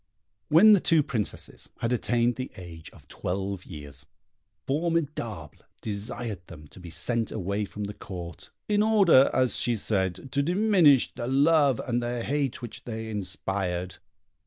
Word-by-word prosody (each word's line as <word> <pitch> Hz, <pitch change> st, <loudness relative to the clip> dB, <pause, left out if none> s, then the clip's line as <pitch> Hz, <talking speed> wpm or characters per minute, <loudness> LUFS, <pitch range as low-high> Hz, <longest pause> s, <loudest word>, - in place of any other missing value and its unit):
When 190 Hz, +8 st, +7 dB
the 200 Hz, -, +6 dB
two 165 Hz, -3 st, +3 dB
Princesses 110 Hz, -7 st, -3 dB
had 115 Hz, +1 st, -1 dB
attained 120 Hz, 0 st, +1 dB
the 130 Hz, 0 st, -5 dB
age 85 Hz, -3 st, -10 dB
of -, -, -19 dB
twelve 95 Hz, +1 st, -4 dB
years, 75 Hz, -3 st, -9 dB, 0.6 s
Formidable 140 Hz, -, -2 dB, 0.3 s
desired 105 Hz, -1 st, -5 dB
them 75 Hz, -4 st, -12 dB
to -, -, -15 dB
be 90 Hz, -1 st, -10 dB
sent 115 Hz, +6 st, -1 dB
away 100 Hz, 0 st, -2 dB
from 105 Hz, +1 st, -7 dB
the 100 Hz, +1 st, -4 dB
Court, 90 Hz, 0 st, -9 dB, 0.2 s
in 210 Hz, -1 st, +2 dB
order, 200 Hz, -11 st, +5 dB
as 130 Hz, -1 st, +2 dB
she 120 Hz, -2 st, +1 dB
said, 95 Hz, +3 st, -2 dB
to 140 Hz, -, +1 dB
diminish 175 Hz, -, +4 dB
the 120 Hz, -1 st, -5 dB
love 140 Hz, 0 st, +3 dB
and 120 Hz, -1 st, -1 dB
the 120 Hz, 0 st, -3 dB
hate 140 Hz, -3 st, -2 dB
which 115 Hz, -2 st, -8 dB
they 110 Hz, -1 st, -5 dB
inspired. 95 Hz, -2 st, -3 dB
115 Hz, 150 wpm, -27 LUFS, 95-140 Hz, 0.6 s, When